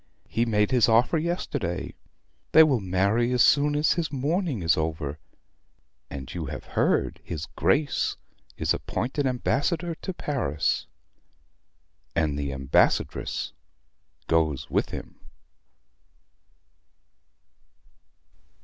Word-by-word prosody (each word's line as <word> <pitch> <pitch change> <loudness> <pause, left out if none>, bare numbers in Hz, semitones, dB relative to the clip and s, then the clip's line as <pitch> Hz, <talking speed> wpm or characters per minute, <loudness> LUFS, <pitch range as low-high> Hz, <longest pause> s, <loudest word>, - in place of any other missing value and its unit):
"He 115 - 0
made 105 -2 +2
his 125 -3 +4
offer 120 +8 +4
yesterday. 145 - -3 0.6
They 160 - +10
will 140 -6 +3
marry 100 +6 +1
as 125 - +5
soon 145 +1 +4
as 150 +1 +3
his 165 -2 -2
mourning 145 - -1
is 85 0 +4
over; 80 -2 -3 0.9
and 65 -2 -7
you 85 -4 -4
have 70 0 -6
heard - - +1
his 80 -2 -5
Grace 140 - 0 0.4
is - - +1
appointed 135 +3 -2
Ambassador 150 +7 0
to 190 - -6
Paris; 80 - -1 1.3
and 80 -3 +1
the 70 -1 -3
Ambassadress 65 0 +1 0.7
goes 80 -3 0
with - - +1
him." - - -8
115 Hz, 105 wpm, -26 LUFS, -, 1.3 s, They